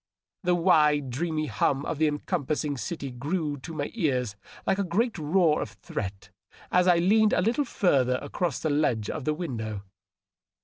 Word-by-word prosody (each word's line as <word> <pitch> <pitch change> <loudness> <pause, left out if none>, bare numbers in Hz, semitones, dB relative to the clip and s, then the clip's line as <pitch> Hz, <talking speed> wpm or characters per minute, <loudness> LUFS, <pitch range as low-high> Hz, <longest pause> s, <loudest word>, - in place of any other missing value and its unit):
The 180 -1 +2
wide, 150 -6 +3
dreamy 155 +3 -1
hum 135 +2 0
of 155 - -3
the 160 - +4
encompassing 150 -1 -1
ciiy 140 -3 -5
grew 150 +1 -1
to 155 +5 -9
my 145 -2 -3
ears 130 - 0 0.3
like 190 - +1
a - - +2
great 210 +6 0
roar 155 0 +3
of 105 - -5
threat 100 -2 -6 0.4
as 180 0 +4
I 175 -1 +6
leaned 210 +5 +4
a - - +3
little 235 +9 +1
further 135 - +2
across 150 +1 -2
the 155 - -1
ledge 125 -8 +1
of 150 -5 -5
the 155 - +1
window. 110 - -4
155 Hz, 170 wpm, -27 LUFS, 135-180 Hz, 0.4 s, I